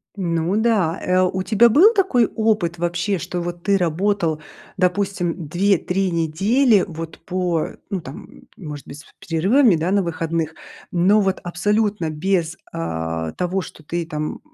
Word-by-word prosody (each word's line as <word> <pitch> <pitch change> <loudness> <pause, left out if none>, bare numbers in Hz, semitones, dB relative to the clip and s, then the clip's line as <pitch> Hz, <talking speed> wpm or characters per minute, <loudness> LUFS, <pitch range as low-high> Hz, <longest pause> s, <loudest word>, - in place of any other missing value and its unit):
Ну 170 -1 -1
да. 215 -8 +1
Э, 185 0 +2
у 185 0 0
тебя 235 +3 +5
был 365 - +6
такой 360 - +3
опыт 210 -6 +1
вообще, 175 +4 -1
что 175 +2 -4
вот 175 0 -5
ты 200 0 +3
работал, 170 -2 0 0.4
допустим, 180 -3 -1
2-3 190 +2 +1
недели 195 - +2
вот 165 -1 -7
по, 180 -3 -1 0.2
ну 195 -3 -2
там, 135 -1 -9
м, - - -18
может 150 -5 -8
быть 145 - -9
с - - -14 0.2
перерывами, 195 - +3
да, 165 +3 -1
на 200 0 +3
выходных, 165 -1 -2 0.4
но 195 +4 +4
вот 190 -1 0
абсолютно 205 +1 0
без, 170 +1 -1
а, 80 -1 -3
того, 180 +2 -1
что 160 - -11
ты 170 +2 -3
там 150 -1 -4
180 Hz, 155 wpm, -21 LUFS, 165-200 Hz, 0.4 s, был